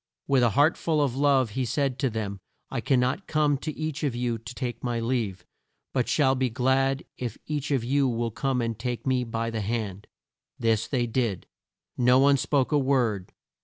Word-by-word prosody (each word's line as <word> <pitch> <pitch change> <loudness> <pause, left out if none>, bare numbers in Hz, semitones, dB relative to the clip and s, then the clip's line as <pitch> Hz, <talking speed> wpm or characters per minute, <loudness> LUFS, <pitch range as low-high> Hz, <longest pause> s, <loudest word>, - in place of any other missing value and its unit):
With 135 -2 +3
a 120 - +4
heart 145 +4 +5
full 160 -2 0
of 140 -4 +1
love 135 -4 +3
he 130 +4 -1
said 130 +2 -1
to 135 - +1
them, 105 -3 -4 0.3
"I - - -2
can 130 - +2
not 130 +10 0
come 150 -2 +2
to 155 - -3
each 155 -1 -3
of 140 -5 0
you 120 -1 -1
to 120 +3 -9
take 125 -3 -4
my 120 -2 -1
leave, 115 -7 -2 0.5
but 125 -3 0
shall 135 -4 +3
be 130 -1 0
glad 130 +3 +1 0.2
if 120 -4 -4
each 150 -1 -3
of 135 -5 +1
you 135 +3 +2
will 115 -1 -1
come 130 +1 -1
and 115 -2 -3
take 120 0 -3
me 130 -2 +2
by 115 0 -3
the 110 -1 -2
hand." 105 -2 -3 0.5
This 115 -1 +1
they 125 -4 0
did. 115 -5 -1 0.5
No 125 +1 +5
one 140 +1 +5
spoke 140 -1 +1
a 150 - +4
word. 120 -8 +1
125 Hz, 200 wpm, -26 LUFS, 115-140 Hz, 0.5 s, heart